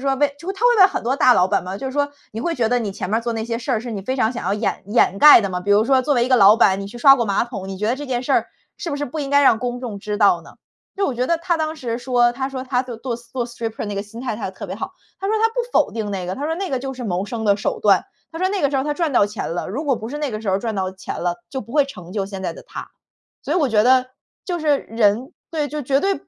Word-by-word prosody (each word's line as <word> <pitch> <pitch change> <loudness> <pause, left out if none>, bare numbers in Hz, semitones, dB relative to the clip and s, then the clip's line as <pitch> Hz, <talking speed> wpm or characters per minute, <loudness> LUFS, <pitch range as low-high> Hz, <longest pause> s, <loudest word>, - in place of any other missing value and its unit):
说 270 0 +1
问 290 +2 +3 0.3
他 405 +5 -4
会 485 -1 +4
问 380 - +9
很 - - -4
多 250 +3 +1
大 255 -2 +5
老 180 - +4
板 - - 0
嘛。 185 +1 -5
就 265 - -5
是 260 - -4
说 285 +1 0 0.2
你 220 - -5
会 340 - -1
觉 230 -3 +1
得 245 +1 +2
你 215 -3 -3
前 190 -1 -5
面 220 - +2
儿 - - -4
做 235 0 -2
那 220 -1 -3
些 230 0 -2
事 255 +3 -5
儿 225 - +1
是 240 +1 -7
你 200 -3 -5
非 260 +7 -2
常 230 -3 +1
想 240 - -6
要 190 - 0
掩 210 +2 -2
掩 205 -3 +2
盖 295 -1 +9
的 200 - -2
吗？ 180 0 -3
比 205 - -3
如 205 +2 +5
说 260 +1 +3
作 290 +2 +1
为 240 -2 +3
一 - - -2
个 255 - +5
老 205 0 +7
板， 195 -3 +3
你 195 - -5
去 210 - -10
刷 275 +2 +8
过 235 - 0
马 200 +2 +1
桶， 200 -6 -7
你 195 - -5
觉 210 - -1
得 235 - +2
这 290 +1 -7
件 250 -2 -2
事 - - -1
儿 - - +2 0.3
是 335 - -4
不 285 - -2
是 290 - -2
不 295 +3 -5
应 275 -1 -4
该 285 0 +5
让 235 -5 +5
公 245 +1 -3
众 225 -6 -5
知 210 +1 -3
道 200 -5 +4
呢？ - - -15 0.4
就 395 0 +1
我 260 - -2
觉 250 +1 -1
得 335 +2 +1
他 340 +1 0
当 315 0 -2
时 240 -5 -3
说， 240 -1 +2
他 265 +2 -3
说 260 -1 -6
他 250 -1 0
就 250 -3 -8
做 235 +1 -4
stri 235 0 -18
做 245 -2 -2
stripper 230 -2 -5
那 205 - -4
个 200 - -2
心 220 +3 -11
态 255 -3 -3
他 210 - -4
特 190 - -8
别 - - -5
好， - - -5 0.3
他 390 - -2
说 435 - +1
他 450 +1 +3
不 - - -20 0.2
否 - - +3
定 215 -3 -3
那 185 -2 -4
个， 185 - -3
他 280 - -5
说 320 - -1
那 385 +1 -3
个 265 - 0
就 265 +1 -5
是 250 - -7
谋 185 -2 -1
生 225 +1 -5
的 200 -1 +4
手 205 - -2
段。 - - +4 0.3
他 325 - -6
说 370 +2 +1
那 395 -1 -1
个 280 - +3
时 280 - 0
候 265 - +1
他 295 - 0
赚 315 -2 -1
到 205 - +5
钱 210 -4 -5
了， 175 - -3
如 260 +11 -4
果 280 -3 +2
不 220 - -7
是 290 +4 -5
那 295 -2 -2
个 215 - -4
时 220 - -5
候 190 - +3
儿 - - -2
赚 220 0 -3
到 190 -1 -1
钱 190 0 -7
了， 175 0 -1
就 265 - -4
不 230 - -12
会 290 -1 +4
成 180 -10 -10
就 200 -2 -2
现 195 -1 -7
在 - - -2
的 - - -12
他。 - - -8 0.5
所 285 - -3
以 - - +2
我 300 -6 +2
觉 215 -3 +3
得， 255 +2 +4 0.4
就 355 -2 -2
是 300 -3 +2
人 225 +3 0 0.2
对， 310 -3 -1
就 300 +1 -4
绝 270 +1 +2
对 390 +3 +1
240 Hz, 390 characters per minute, -21 LUFS, 210-280 Hz, 0.5 s, 问